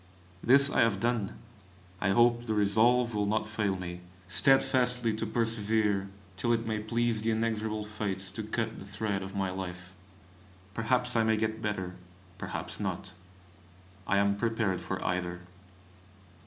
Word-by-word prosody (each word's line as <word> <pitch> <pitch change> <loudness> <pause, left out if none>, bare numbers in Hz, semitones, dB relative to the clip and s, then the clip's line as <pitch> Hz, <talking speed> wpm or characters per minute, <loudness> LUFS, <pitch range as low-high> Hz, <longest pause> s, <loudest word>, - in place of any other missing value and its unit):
This 140 +3 +7
I - - +3
have 110 -4 +2
done. 115 -3 -1 0.6
I - - +1
hope 120 +3 +3
the 110 - 0
resolve 115 +4 +3
will 105 -1 0
not 110 +1 0
fail 105 -2 -1
me, 90 -1 -6 0.3
steadfastly 125 +3 +3
to 110 +1 -3
persevere 110 -3 0 0.3
till 120 +4 +1
it 115 0 0
may 110 -1 -1
please 115 0 0
the 110 - 0
inexorable 110 -1 -1
Fates 100 -3 -4
to - - -5
cut 110 +1 -3
the - - -9
thread 100 0 -2
of 95 +1 -7
my 95 -1 -1
life. 90 -1 -6 0.8
Perhaps 125 +3 +1
I 115 - +4
may 110 0 +2
get 110 0 -2
better, 95 -4 -3 0.4
perhaps - - -4
not. 95 - -4 0.9
I 100 - +2
am 100 0 +2
prepared 110 -4 0
for - - -3
either. 90 0 -2
110 Hz, 150 wpm, -30 LUFS, 100-115 Hz, 0.9 s, This